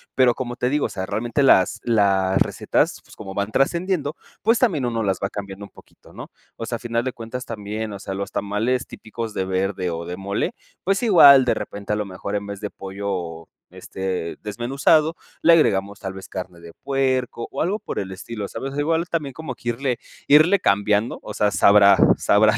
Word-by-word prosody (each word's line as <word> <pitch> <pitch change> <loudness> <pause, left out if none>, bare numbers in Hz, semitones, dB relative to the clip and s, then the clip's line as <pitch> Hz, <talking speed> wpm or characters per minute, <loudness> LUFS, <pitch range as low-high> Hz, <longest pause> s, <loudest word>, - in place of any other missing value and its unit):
pero, 130 -2 +4
como 120 -2 -4
te 125 - 0
digo, 145 +2 +1
o - - -15
sea, 95 - -4
realmente 115 +7 -1
las 95 -9 +4
las 100 -5 +2 0.2
recetas, - - 0
pues, - - -17
como 95 -2 -8
van 100 +1 -2
trascendiendo, 160 - 0 0.3
pues, 230 +2 +3
también 170 - +1
uno 115 -2 -1
las 95 -2 0
va 100 - 0
cambiando 100 -1 -7
un - - -15
poquito, - - -19
¿no? - - -10 0.3
O 115 - -5
sea, 120 - -3
a - - -19
final 115 0 -2
de 130 - -2
cuentas 120 +2 -7
también, 105 0 -5
o 100 - -7
sea, 95 - -6
los 100 +1 -4
tamales 115 +6 -1
típicos 110 0 -7
de 95 - -2
verde 95 -1 -1
o 85 0 -5
de 90 +1 -6
mole, 100 +1 -2 0.3
pues, 195 +4 0
igual, 140 - +8
de 125 - +3
repente, 100 0 -5
a - - +1
lo 105 0 -2
mejor, 100 +1 -5
en 100 0 -3
vez 100 0 -7
de 105 - -3
pollo, 95 -4 -5 0.2
este, 95 -3 -5
desmenuzado, 140 +9 +1 0.3
le 170 - +6
agregamos 100 -10 +2
tal 95 -1 -5
vez 95 0 -10
carne 90 -2 -7
de 85 - -11
puerco 130 -3 -1
o 135 - -3
algo 195 +6 0
por - - -5
el 95 -1 -5
estilo, 100 +2 -6
¿sabes? 135 +6 -6
Igual 165 +3 0
también 150 -5 -2
como 160 -2 -6
que 120 - -5
irle 125 +1 -1 0.3
irle 155 +7 +6
cambiando, 105 - +1
o - - -8
sea, 105 -1 +1
sabrá, 100 -1 +6 0.2
sabrá 105 +1 +4
110 Hz, 205 wpm, -22 LUFS, 100-135 Hz, 0.3 s, igual